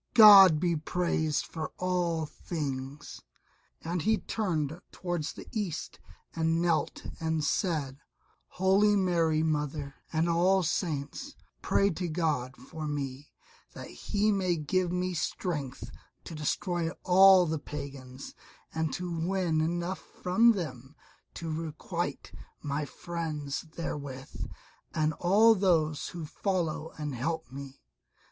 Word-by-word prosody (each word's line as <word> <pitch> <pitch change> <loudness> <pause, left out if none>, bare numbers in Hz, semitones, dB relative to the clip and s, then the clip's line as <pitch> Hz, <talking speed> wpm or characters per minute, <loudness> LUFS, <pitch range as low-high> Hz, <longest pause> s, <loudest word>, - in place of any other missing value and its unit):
God 195 -8 +10
be 170 0 +1
praised 160 -1 0
for 155 -3 -5
all 175 -3 0
things." 145 -3 -5 0.6
And 170 +1 -2
he 220 +5 +3
turned 170 -6 -2
toward 175 -4 -3
the - - -7
East 195 -8 -4 0.4
and 165 0 +1
knelt 170 -2 0
and 160 -1 -1
said, 150 -6 -1 0.5
"Holy 195 +3 +3
Mary 165 -5 +2
Mother, 150 -2 -1 0.2
and 160 +1 +1
all 180 +3 +3
Saints, 160 - -2 0.3
pray 200 0 +2
to 180 +1 -3
God 155 -6 -1
for 160 -2 -7
me, 140 -1 -4 0.4
that - - -8
He 210 +1 0
may 185 -3 +1
give 175 +3 0
me 180 0 -1
strength 150 -5 -3 0.3
to - - -8
destroy 165 +3 -1
all 190 0 +7
the 160 -1 -1
Pagans, 135 -3 -8 0.4
and 160 -1 -1
to 180 - -3
win 170 -1 0
enough 175 +3 -1
from 225 +6 +3
them 140 - -6 0.4
to 165 -1 -4
requite 165 +2 -4 0.3
my 145 0 -2
friends 155 -2 -4
therewith, 140 -5 -5 0.5
and 155 0 +2
all 210 +6 +6
those 160 -7 +1
who 170 -3 -6
follow 165 -2 -2
and 150 -2 -4
help 155 +1 -3
me." 140 0 -9
165 Hz, 120 wpm, -29 LUFS, 150-180 Hz, 0.6 s, God